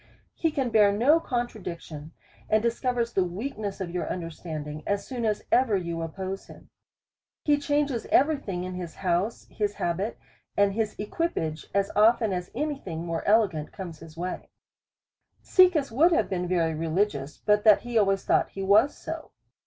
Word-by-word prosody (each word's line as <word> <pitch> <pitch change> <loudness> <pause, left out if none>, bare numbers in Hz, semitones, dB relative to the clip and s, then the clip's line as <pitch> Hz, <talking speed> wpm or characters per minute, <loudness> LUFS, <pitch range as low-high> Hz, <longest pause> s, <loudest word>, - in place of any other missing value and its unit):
He 325 - 0
can 270 -5 -1
bear 210 -2 +5
no 255 +11 +4
contradiction, 180 - -5 0.4
and 215 0 +3
discovers 235 0 0
the 190 - +3
weakness 205 +2 -4
of 180 -3 -4
your 180 0 -3
understanding, 155 -3 -5
as 200 0 -1
soon 245 -3 -3
as 210 -1 0
ever 240 -5 +4
you 170 -2 -3
oppose 190 +4 -5
him. - - -15 0.7
He 290 -1 +2
clianges 290 -4 0
every 295 +3 +4
thing 190 -9 -4
in 185 0 -5
his 180 -2 -6
house, 185 +4 -1
his 205 -1 -1
habit, 185 +6 -2 0.4
and 200 -1 +4
his 215 0 -1
equipage, 205 - -2
as 200 0 +1
often 220 0 +4
as 180 0 -3
any 295 +1 -2
thing 165 -6 -6
more 165 -1 -3
elegant 195 -8 +2
comes 175 -6 -8
in 165 - -9
his 160 0 -16
way; 180 +2 -5 1.0
Caecus 360 - +4
would 315 +10 +4
have 335 - +1
been 180 -1 -1
very 170 -3 +1
religious, 155 -3 -1
but 210 0 +2
that 215 -2 +6
he 240 0 -7
always 195 -3 +3
thought - - +2
he 195 - -6
was 215 +9 +4
so. - - -6
200 Hz, 170 wpm, -27 LUFS, 175-235 Hz, 1.0 s, that